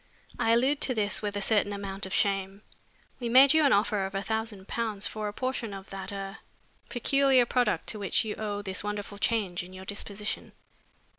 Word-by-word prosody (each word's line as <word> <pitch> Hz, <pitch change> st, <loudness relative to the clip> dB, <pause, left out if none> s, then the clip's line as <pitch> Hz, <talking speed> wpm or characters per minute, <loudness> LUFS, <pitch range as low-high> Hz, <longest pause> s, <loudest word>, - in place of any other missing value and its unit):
"I -, -, +2 dB
allude 270 Hz, +5 st, +2 dB
to 255 Hz, -, +1 dB
this 210 Hz, -2 st, 0 dB
with 205 Hz, -1 st, -3 dB
a 200 Hz, -, -1 dB
certain 205 Hz, -1 st, +2 dB
amount 195 Hz, -1 st, -4 dB
of -, -, -11 dB
shame. 195 Hz, 0 st, 0 dB, 0.6 s
We 240 Hz, -2 st, -3 dB
made 265 Hz, +4 st, +8 dB
you 315 Hz, 0 st, +4 dB
an 275 Hz, -, +5 dB
offer 205 Hz, 0 st, +2 dB
of 195 Hz, -, -10 dB
a 195 Hz, -, -1 dB
thousand 220 Hz, -2 st, -3 dB
pounds 220 Hz, -4 st, 0 dB
for 215 Hz, -1 st, -3 dB
a -, -, -3 dB
portion 245 Hz, -4 st, -3 dB
of 195 Hz, 0 st, -10 dB
that 195 Hz, 0 st, -6 dB
er 195 Hz, +1 st, -6 dB, 0.5 s
peculiar 270 Hz, 0 st, +4 dB
product 245 Hz, -3 st, +1 dB
to 215 Hz, -, -3 dB
which 200 Hz, +2 st, +1 dB
you 215 Hz, -, -2 dB
owe 205 Hz, -1 st, -4 dB
this 190 Hz, 0 st, -2 dB
wonderful 205 Hz, 0 st, -5 dB
change 200 Hz, -6 st, 0 dB
in 180 Hz, +1 st, -11 dB
your 185 Hz, 0 st, -9 dB
disposition. 205 Hz, +1 st, -5 dB
210 Hz, 200 wpm, -28 LUFS, 195-230 Hz, 0.6 s, made